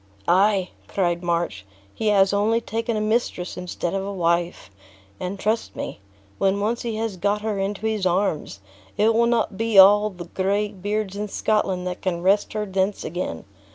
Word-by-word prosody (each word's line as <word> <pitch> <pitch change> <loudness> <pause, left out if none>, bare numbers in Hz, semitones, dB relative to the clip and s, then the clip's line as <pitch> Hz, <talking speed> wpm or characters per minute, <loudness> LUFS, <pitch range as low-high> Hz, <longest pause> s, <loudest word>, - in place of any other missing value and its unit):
"Ay," 190 0 +3 0.2
cried 175 -3 0
March, 170 - -1 0.3
"he 220 - -3
has 195 -1 +4
only 215 +3 +2
taken 230 0 -2
a - - 0
mistress 215 -4 -1
instead 180 -1 -4
of 195 0 -1
a 200 - -4
wife; 170 - -1 0.5
and, 185 +2 -4
trust 220 +3 -1
me, - - -5 0.4
when 195 +1 +2
once 225 +4 -1
he 230 -2 -3
has 220 -3 -3
got 205 +3 0
her 215 -2 -1
into 200 +2 -3
his 220 -3 -1
arms, 180 - 0 0.4
it 220 +2 +4
will 235 +1 +3
not 230 -4 0
be 225 -2 +1
all 205 +2 +8
the 180 -3 -9
gray 200 +4 0
beards 205 0 -3
in 210 +1 -3
Scotland 195 -3 0
that 180 0 -4
can 175 -2 -2
wrest 200 +2 +2
her 215 -1 -2
thence 195 +1 -1
again. 165 - -4
200 Hz, 180 wpm, -23 LUFS, 180-215 Hz, 0.5 s, all